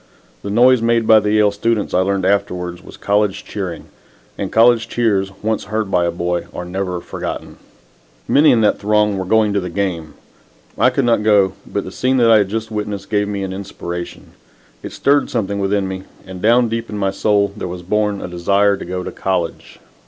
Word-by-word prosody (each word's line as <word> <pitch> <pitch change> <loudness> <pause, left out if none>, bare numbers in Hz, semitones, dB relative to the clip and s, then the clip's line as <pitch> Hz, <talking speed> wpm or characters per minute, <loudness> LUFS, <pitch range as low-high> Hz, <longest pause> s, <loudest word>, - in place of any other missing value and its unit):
The 100 - -6
noise 125 +3 +4
made 115 0 +2
by 110 0 +7
the 105 0 -1
Yale 105 -1 +3
students 105 +1 -1
I - - +3
learned 95 0 0
afterwards 90 -3 -1
was - - -13
college 100 -1 0
cheering, 95 -5 -5 0.5
and - - -4
college 115 0 +4
cheers 100 -5 0
once 110 -1 -1
heard 110 -1 -3
by 90 -1 +2
a 85 - 0
boy 85 0 -2
are 90 - -5
never 90 0 -3
forgotten. - - -6 0.7
Many 150 +2 +5
in 115 - +4
that 105 - +2
throng 105 -1 +1
were 95 - -3
going 110 +1 +2
to 100 - +1
the 90 -1 -5
game. 85 -4 -3 0.6
I - - +4
could 130 0 0
not 115 -3 +2
go, 105 -3 +3
but - - -3
the - - -8
scene 130 +1 0
that 115 -2 +4
I 110 - +7
had 100 -2 0
just 110 +1 -4
witnessed 105 -1 -5
gave 105 -1 +1
me 100 -1 -3
an 95 -1 -4
inspiration. 90 -2 -7 0.5
It - - -7
stirred 145 +1 +2
something 100 -4 -2
within 100 0 0
me, 95 0 -6 0.2
and 95 -1 -9
down 120 +2 +4
deep 115 +1 -4
in 105 - -5
my 95 -1 0
soul 100 0 +1
there 105 - -5
was 90 0 -7
born 105 +1 0
a - - -5
desire 100 +3 +1
to - - -8
go 90 +1 -4
to - - -6
college. 90 -3 -3
100 Hz, 205 wpm, -18 LUFS, 95-110 Hz, 0.7 s, by